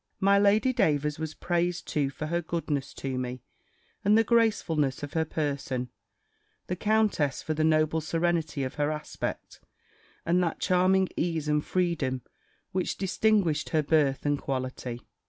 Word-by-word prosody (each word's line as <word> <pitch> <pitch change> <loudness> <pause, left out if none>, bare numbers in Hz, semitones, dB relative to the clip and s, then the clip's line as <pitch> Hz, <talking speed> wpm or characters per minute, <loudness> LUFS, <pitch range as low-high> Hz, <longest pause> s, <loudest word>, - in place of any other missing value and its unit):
My 200 +1 +4
Lady 210 +5 +4
Davers 150 - +1
was 160 -1 -4
praised 175 0 -1
too 145 -4 0
for 145 +3 -6
her 170 +2 -1
goodness 155 -4 -3
to 130 -2 -3
me, 125 -1 -5 0.6
and 210 +2 +5
the 225 - +5
gracefulness 195 - +1
of 145 - -6
her 160 -1 +1
person; 140 -5 -2 0.8
the 180 - -3
countess 210 -9 +1
for 155 - -1
the 155 0 0
noble 155 0 +2
serenity 165 -2 0
of 130 - -3
her 145 - +2
aspect, 150 0 -5 0.7
and 175 +2 +3
that 170 -2 -1
charming 185 +1 +3
ease 165 -3 -1
and 150 0 +2
freedom, 155 -9 -1 0.5
which 185 -1 -1
distinguished 195 -5 +1
her 155 -2 +2
birth 145 -3 +2
and 145 -1 +1
quality. 130 -2 -4
160 Hz, 150 wpm, -28 LUFS, 145-180 Hz, 0.8 s, and